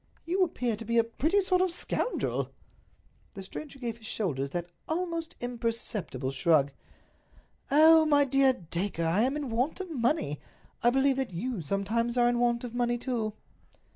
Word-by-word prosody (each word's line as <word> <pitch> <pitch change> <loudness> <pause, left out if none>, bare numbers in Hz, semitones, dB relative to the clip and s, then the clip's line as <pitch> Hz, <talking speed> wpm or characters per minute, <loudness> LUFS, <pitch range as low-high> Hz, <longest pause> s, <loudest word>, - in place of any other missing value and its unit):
"You 370 +3 +2
appear 250 -9 -1
to 225 - -7
be 235 +1 0
a 230 - +6
pretty 315 - +1
sort 370 -1 +2
of 370 - +2
a - - -4
scoundrel." 485 - -1 0.9
The 195 - -7
stranger 275 +8 -8
gave 235 -3 -4
his 220 - -10
shoulders 140 -13 -2
that 175 +3 -4 0.2
almost 335 0 -3
imperceptible 230 - -2
shrug. 140 0 +3 1.0
"Oh, 315 +2 +7
my 290 -1 +5
dear 270 0 +4
Dacre, 175 -4 -3
I 170 +6 +2
am 265 +5 +1
in 285 -5 -4
want 250 +10 0
of 370 -3 -6
money! 240 - 0 0.4
I 240 - +5
believe 270 +1 +3
that 265 -1 -1
you 235 +2 -3
sometimes 220 - -1
are 240 0 +5
in 240 0 +1
want 240 0 +1
of 240 -2 -6
money, 240 0 +1
too." 230 -4 -2
240 Hz, 170 wpm, -29 LUFS, 210-285 Hz, 1.0 s, Oh